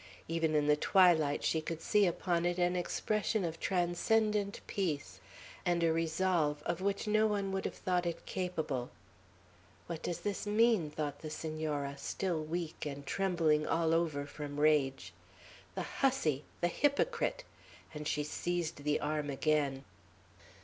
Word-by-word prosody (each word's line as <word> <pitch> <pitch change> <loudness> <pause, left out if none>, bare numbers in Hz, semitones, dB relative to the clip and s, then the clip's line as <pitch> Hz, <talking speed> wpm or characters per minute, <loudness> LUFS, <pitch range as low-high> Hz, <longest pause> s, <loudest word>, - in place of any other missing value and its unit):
Even 165 -1 0
in 150 -1 +3
the 150 0 +5
twilight 160 -3 +4
she 160 - +1
could 160 0 -4
see 205 +3 +3
upon 170 0 0
it 175 0 0
an 180 0 +2
expression 210 +3 0
of 165 -1 -4
transcendent 200 +3 +1
peace, 165 -8 -2 0.4
and 175 -1 +1
a 165 -1 +3
resolve 160 -2 +1
of 175 +1 -1
which 200 +2 0
no 215 +1 +3
one 200 -2 -1
would 190 0 -2
have - - -3
thought 180 -1 0
it 170 - -4
capable. 160 -9 -2 1.0
"What 165 -2 -5
does 175 -1 -3
this 205 +2 -3
mean?" 215 -6 +3
thought 150 -1 -4
the 155 - -5
Senora, 155 -3 -3
still 175 -5 -2
weak, 165 +1 -4
and 140 -1 -5
trembling 165 -4 +1
all 165 -1 +2
over, 160 -4 +1
from 145 0 -6
rage. 135 - +2 0.6
"The - - -2
hussy, 160 - 0 0.2
the 175 - +3
hypocrite!" 460 - +1 0.5
and 150 -1 -5
she 150 - 0
seized 175 +2 -2
the 150 0 +1
arm 150 -1 -2
again. 140 -1 0
165 Hz, 150 wpm, -33 LUFS, 150-185 Hz, 1.0 s, the